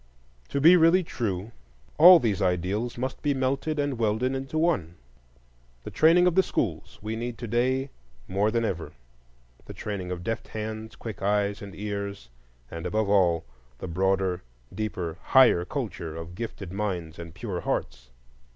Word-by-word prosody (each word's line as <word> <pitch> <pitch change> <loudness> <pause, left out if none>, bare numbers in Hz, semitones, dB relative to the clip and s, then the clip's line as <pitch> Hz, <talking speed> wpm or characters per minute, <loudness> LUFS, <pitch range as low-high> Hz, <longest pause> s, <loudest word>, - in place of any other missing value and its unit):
To 140 - -1
be 165 +6 +8
really 170 +3 +5
true, 105 - -3 0.5
all 180 +3 +11
these 105 -7 0
ideals 95 +6 -1
must 130 +2 -4
be 145 -2 +1
melted 135 +4 -1
and 145 -4 -1
welded 115 +4 +1
into 135 +3 -4
one. 130 - +1 0.9
The - - -7
training 170 +3 +5
of 180 - +3
the 190 - +5
schools - - -3
we 110 +1 -3
need 120 0 -4
to 120 - -6
day 130 +4 0 0.4
more 100 +3 +1
than 115 +1 0
ever,—the 60 - -9
training 100 -4 -5
of 90 -1 -5
deft 115 +3 -3
hands, 110 0 -6
quick 110 -5 -8
eyes 100 0 0
and 100 -2 -9
ears, 100 -8 -5 0.4
and 85 +1 -5
above 110 +2 0
all 85 -5 +3 0.3
the 95 - -6
broader, 95 +1 0 0.3
deeper, 95 -5 -4
higher 125 -10 +5
culture 90 - -5
of 80 +1 -7
gifted 100 -3 -6
minds 90 -6 -3
and 85 -1 -9
pure 95 -5 -4
hearts. - - -3
105 Hz, 155 wpm, -26 LUFS, 90-125 Hz, 0.9 s, all